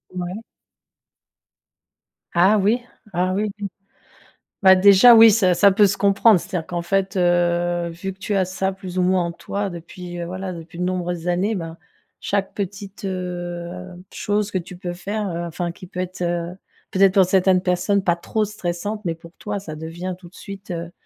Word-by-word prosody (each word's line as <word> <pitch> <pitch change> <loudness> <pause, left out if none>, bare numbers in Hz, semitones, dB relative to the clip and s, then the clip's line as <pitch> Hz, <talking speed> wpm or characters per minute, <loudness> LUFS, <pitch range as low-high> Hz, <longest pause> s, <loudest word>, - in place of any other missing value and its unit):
Ouais. 180 +4 -4 1.9
Ah 185 +5 +5
oui? 210 +5 +2 0.3
Ah 180 +1 0
oui, 210 +2 0
oui. 200 - -3 0.9
Bah, 190 -1 +8
déjà, 200 +5 +8
oui, 225 0 +9
ça 190 -4 +3
ça 200 +3 +6
peut 205 +1 +5
se 195 0 -1
comprendre. 200 0 +4
C'est-à-dire 170 -2 -5
qu'en 175 -1 -3
fait, 195 +1 0
heu, 175 -1 +1
vu 170 +3 -6
que 190 - -27
tu 205 +1 -2
as 190 -2 +2
ça, 190 +1 -2
plus 185 -1 -6
ou - - +3
moins, 180 0 +2
en 170 - -3
toi, 200 +3 -4
depuis, 175 +1 -8
heu, - - -3
voilà, 185 +1 -5
depuis 170 0 -10
de 180 - -2
nombreuses 180 -1 -2
années, 190 +5 +1
ben, 165 -2 -6 0.4
chaque 200 -1 -1
petite, 200 +1 -6
heu, 180 -1 -5 0.3
chose 205 0 -1
que 185 - 0
tu 175 +1 -10
peux 175 -1 -5
faire, 205 +4 -3
heu, 170 - -3
enfin, 170 +1 -3
qui 185 - -12
peut 180 - -7
être, 185 0 -5
heu, 175 0 -1 0.4
peut-être, 195 0 +4
pour 190 - +6
certaines 185 0 +3
personnes, 190 +2 +1
pas 175 -2 +2
trop 215 +5 -1
stressante, 205 +1 -4
mais 165 -3 -2
pour 165 0 -15
toi, 205 -1 -3
ça 180 -6 -7
devient 165 +4 -5
tout 175 -2 -13
de 180 - -22
suite, 195 -1 -10
heu, 170 -1 -5
185 Hz, 190 wpm, -22 LUFS, 175-195 Hz, 1.9 s, oui